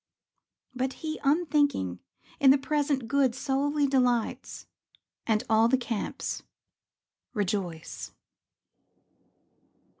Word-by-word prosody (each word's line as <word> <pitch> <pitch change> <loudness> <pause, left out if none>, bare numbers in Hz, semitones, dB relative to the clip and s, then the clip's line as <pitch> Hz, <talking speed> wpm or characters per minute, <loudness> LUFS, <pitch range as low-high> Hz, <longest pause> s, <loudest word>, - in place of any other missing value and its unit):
But 260 +1 -2
he, 310 0 -3
unthinking, 285 - +1 0.4
in 275 -3 +6
the 275 - +7
present 280 -2 -1
good 270 -2 +2
Solely 285 +2 0
delights, 250 -4 0 0.6
and 215 -2 +2
all 220 +1 +4
the 260 +2 +3
camps 235 -4 -3 0.9
rejoice. 185 -5 -3
265 Hz, 85 wpm, -28 LUFS, 225-285 Hz, 0.9 s, the